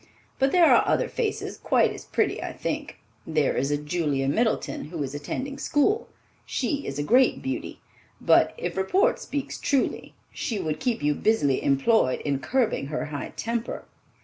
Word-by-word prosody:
But 270 +1 +3
there 355 -2 +6
are - - +5
other - - +2
faces 435 -3 -3
quite - - +3
as - - -10
pretty, - - 0
I - - -5
think. - - -4 0.3
There 155 -3 +1
is 135 +2 0
a 145 - +1
Julia 150 -3 -1
Middleton, 220 - 0
who 155 -1 -4
is 135 0 -5
attending 260 - -5
school. 410 +10 +1 0.4
She 280 +2 -2
is 135 - -4
a 145 - -1
great 250 - +3
beauty, 265 - -4 0.4
but, - - +4
if 480 - -4
report 370 - +2
speaks 285 -2 -4
truly, 275 -2 -1 0.2
she 225 - -3
would 155 -5 -2
keep 245 - -1
you 150 0 +3
busily 145 -7 +1
employed 140 - +3
in 140 -2 -1
curbing 225 - 0
her 155 +1 -3
high 145 - -5
temper." 230 +1 -3
205 Hz, 170 wpm, -26 LUFS, -, 0.4 s, there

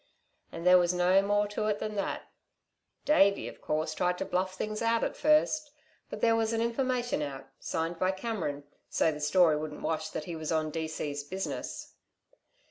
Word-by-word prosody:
And 170 - -7
there 180 0 +8
was 175 0 +2
no 180 +2 +4
more 205 +1 +2
to 210 +1 -2
it 210 -1 +1
than 215 - -4
that. 200 -2 -2 0.8
Davey, 200 -9 +4
of - - -10
course, 155 +1 -1
tried 180 +2 0
to - - -3
bluff 185 +1 -1
things 215 +2 -3
out 230 0 +2
at - - -1
first; 305 0 +3 0.4
but - - -7
there 230 -1 +4
was 225 0 +1
an 225 - 0
information 245 - 0
out, 140 -2 -5
signed 165 +1 -3
by 185 - +2
Cameron, 190 -8 -3 0.3
so 160 - +2
the 150 -1 -7
story 160 +1 +4
wouldn't 150 0 -6
wash 155 -1 -1
that - - -4
he 170 - -5
was 160 0 -4
on 155 -1 0
D.C.'s 155 -2 -3
business." 190 +5 -5
180 Hz, 185 wpm, -30 LUFS, 160-215 Hz, 0.8 s, there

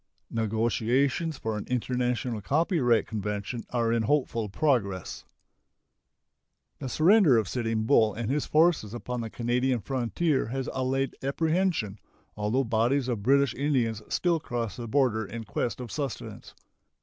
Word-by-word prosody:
Negotiations 120 +7 0
for 110 -3 -3
an - - -8
international 125 -2 -1
copyright 140 - +2
convention 105 +2 -4
are 115 -2 +1
in 115 - +2
hopeful 115 -3 0
progress. 100 - -1 1.5
The 130 - -4
surrender 165 - +5
of 110 -3 +1
Sitting 115 -2 -1
Bull 110 0 +4
and 115 -1 -3
his 145 +1 -1
forces 155 -9 +2
upon 125 0 -4
the 115 - -5
Canadian 125 +2 0
frontier 130 - 0
has 130 +3 -3
allayed 135 +1 -1
apprehension, 160 - 0 0.4
although 105 +6 0
bodies 120 +3 +1
of 120 -5 -2
British 135 +2 +3
Indians 125 -7 0
still 170 -2 +1
cross 120 -6 -4
the 120 -2 -6
border 120 -3 +2
in 115 +2 -6
quest 110 +2 -3
of 120 -4 -7
sustenance. 140 -3 -5
120 Hz, 135 wpm, -27 LUFS, 110-140 Hz, 1.5 s, surrender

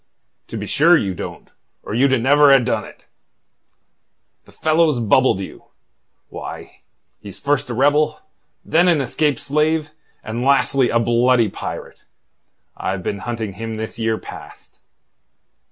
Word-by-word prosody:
"To - - -6
be - - -5
sure 170 +4 +4
you 100 -9 -2
don't, - - -8 0.3
or - - -6
you'd 130 +2 +3
never 145 +2 +5
ha' 135 -2 +6
done 115 -4 -1
it. - - -16 1.4
The - - -19
fellow's 155 -3 +1
bubbled 115 -1 +3
you. 95 - -9 0.6
Why, - - -9 0.4
he's 100 -2 -10
first 140 -2 -1
a 120 - -3
rebel, 145 +4 +2 0.5
then 170 +3 +3
an 170 -4 +3
escaped 140 +1 0
slave, 155 +2 0 0.3
and 110 +2 -4
lastly 135 -1 +3
a 115 - +2
bloody 120 0 +2
pirate. - - -8 0.7
I've 95 -1 -4
been 100 - -3
hunting 110 -1 -4
him 115 +3 -6
this 110 +1 -6
year 110 0 0
past." - - -12
125 Hz, 135 wpm, -20 LUFS, 110-145 Hz, 1.4 s, ha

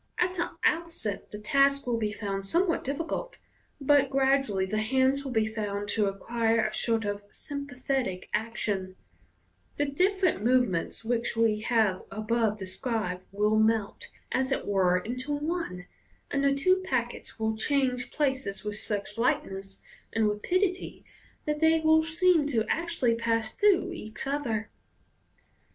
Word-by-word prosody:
At 360 +1 +1
the 345 -1 -1
outset 320 -12 0
the 210 - -7
task 275 +6 +3
will 240 -2 0
be 215 -2 -1
found 200 -1 -3
some 340 - +2
what 335 - 0
difficult, 330 - -3 0.4
but 280 -1 +4
gradually 270 -7 +2
the 215 +3 -1
hands 265 +4 +2
will 270 - -5
be 220 -2 +2
found 205 -2 -3
to 210 -1 +2
acquire 225 +3 +1
a 215 - -2
sort 225 -2 +1
of 205 0 -2
sympathetic 270 -9 -3
action 205 -4 -2 0.8
j 290 - +2
the 280 - -4
different 370 - +2
movements 230 -5 +1
which 235 0 -1
we 225 -2 +3
have 215 -4 +2
above 215 +1 0
described 190 -1 -3
will 210 +2 +2
melt, 220 -2 +1 0.2
as 260 +1 0
it - - -1
were, 185 -3 +3
into 250 +9 -3
one, 295 - -3 0.5
and 280 -1 +1
the 275 0 +3
two 370 +7 +3
packets 240 -8 -3
will 220 -1 0
change 250 0 0
places 265 -8 -1
with 210 -1 -4
such 210 +1 -4
lightness 195 -8 -1 0.3
and 225 -1 +2
rapidity 360 - -1 0.4
that 300 0 -1
they 320 +1 +4
will 315 0 +5
seem 325 -1 +3
to 230 -6 +1
actually 330 -8 +1
pass 230 -1 0
through 380 -3 +3
each 220 -11 -7
other. 240 -7 -2
235 Hz, 145 wpm, -28 LUFS, 210-285 Hz, 0.8 s, will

